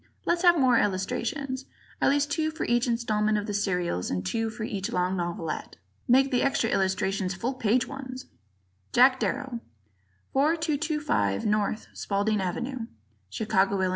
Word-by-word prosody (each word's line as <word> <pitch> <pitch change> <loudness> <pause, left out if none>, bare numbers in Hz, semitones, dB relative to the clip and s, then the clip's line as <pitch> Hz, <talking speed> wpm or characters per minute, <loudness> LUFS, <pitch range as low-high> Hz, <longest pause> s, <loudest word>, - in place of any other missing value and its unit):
Let's 345 0 +1
have 350 -2 +6
more 255 -4 +4
illustrations. 235 +8 -2 0.4
At - - +4
least 290 +1 +1
two 315 +1 +1
for 315 +1 -4
each 240 +1 +1
installment 215 -3 +1
of 205 - -2
the 210 - -4
serials 180 - -1
and 90 0 -2
two 225 - -1
for 225 0 -6
each 200 -3 -3
long 180 +1 0
novelette. 170 -2 -4 0.3
Make 265 +2 +4
the 250 - +2
extra 270 -4 +1
illustrations 190 0 0
full 235 +7 -2
page 245 -1 +1
ones. 260 -2 -7 0.7
Jack 255 +2 +6
Darrow, 265 -3 -2 0.7
4225 300 - +1
N. 210 0 +1 0.2
Spaulding 205 +1 0
Ave., 240 +9 -3 0.5
Chicago, 200 - +1
Ill. 185 -1 +2
230 Hz, 145 wpm, -27 LUFS, 195-270 Hz, 0.7 s, have